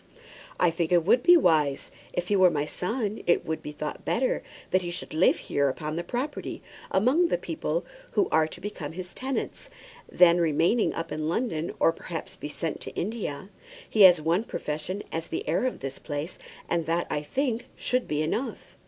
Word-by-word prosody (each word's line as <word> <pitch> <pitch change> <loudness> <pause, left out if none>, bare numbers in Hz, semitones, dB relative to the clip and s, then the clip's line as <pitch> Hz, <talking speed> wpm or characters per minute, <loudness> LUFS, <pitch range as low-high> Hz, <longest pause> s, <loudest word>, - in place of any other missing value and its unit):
"I 175 - +4
think 165 0 -1
it 175 -2 +4
would 235 +6 +5
be 350 +4 +8
wise. 155 - +2 0.2
If 180 0 -3
he 205 - +3
were 185 -2 +6
my 145 -3 -1
son 215 +6 -2
it 175 - +3
would 160 -1 -2
be 150 - -6
thought 150 0 -5
better 255 +2 +1 0.3
that 185 - +3
he 175 - -4
should 175 -2 -4
live 160 +4 +4
here 140 -1 0
upon 155 +3 -4
the 170 - -2
property, 250 - -4 0.3
among 260 - +3
the - - +1
people - - -2 0.3
who 395 - +3
are 160 -1 +4
to - - -10
become 180 -7 -6
his 180 +1 -7
tenants, 265 +1 -4 0.4
than 175 -1 +6
remain 165 +8 +3
up 165 - -4
in 155 0 -2
London, 170 -5 -1
or - - +5
perhaps 165 0 -6
be 150 - -6
sent 160 +1 -3
to - - -7
India. 190 -5 -3 0.4
He 215 - +1
has 180 -4 +9
one 165 +6 +1
profession 155 +3 -4
as 165 0 -3
the - - -4
heir 170 +11 +2
of 255 - -4
this 135 0 -5
place, 145 +2 -5 0.3
and 170 -2 0
that, 170 +1 +1
I 150 - 0
think, 245 - -2
should 250 0 0
be 150 0 0
enough." 225 - -3
175 Hz, 195 wpm, -27 LUFS, 155-220 Hz, 0.4 s, has